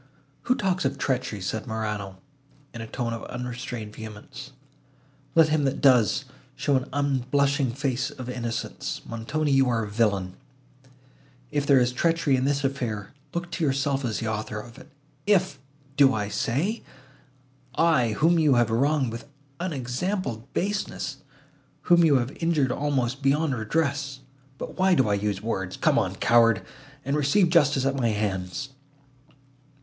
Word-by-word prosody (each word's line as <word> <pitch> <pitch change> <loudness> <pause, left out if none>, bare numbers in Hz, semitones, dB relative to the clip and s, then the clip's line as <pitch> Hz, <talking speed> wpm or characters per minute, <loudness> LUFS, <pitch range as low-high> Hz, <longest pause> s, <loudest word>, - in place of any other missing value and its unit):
"Who 250 - +5
talks 185 -5 0
of 135 +1 -1
treachery?" 130 -7 -2
said 110 +5 -3
Morano, 105 -4 -3 0.6
in 115 - -7
a 115 - -6
tone 115 0 -3
of 115 - -6
unrestrained 125 -3 -6
vehemence. 110 -2 -9 0.8
"Let 165 -1 +6
him 155 -1 +2
that 135 +1 0
does, 130 -1 +4 0.3
show 140 - +1
an 130 0 -1
unblushing 140 -1 +1
face 135 0 -1
of 130 -4 -8
innocence. 120 -2 -4
Montoni, 140 +7 -2
you 135 -1 +4
are 115 -2 +1
a - - -4
villain! 100 -4 0 1.1
If 145 -1 -1
there 140 -2 +6
is 125 0 +2
treachery 165 +1 +2
in 130 0 0
this 140 0 +1
affair, 120 -7 -3 0.2
look 175 0 -3
to 170 - -3
yourself 140 -1 +1
as 115 -4 -1
the 115 - -3
author 110 0 -3
of 115 +2 -11
it. - - -15 0.4
If—do 140 - +1
I 105 -1 -2
say? 140 - -1 0.9
I—whom 160 +1 +3
you 150 -4 +4
have 120 -2 +3
wronged 135 +1 +2
with 120 +5 -7 0.3
unexampled 135 - -3
baseness, 205 +3 -2 0.7
whom 175 -1 +5
you 155 -4 +5
have 125 +1 0
injured 155 -6 +2
almost 135 -1 -1
beyond 140 +2 +2
redress! 140 +3 -1 0.4
But - - -7
why 190 -1 +4
do 130 -8 +3
I - - +2
use 100 0 -1
words?—Come 95 -5 0
on, - - -1
coward, 115 -3 +4 0.4
and 140 +2 0
receive 150 +6 +3
justice 145 -5 +4
at 135 0 +1
my 120 -3 +1
hands!" 105 +2 -2
135 Hz, 145 wpm, -26 LUFS, 115-145 Hz, 1.1 s, Let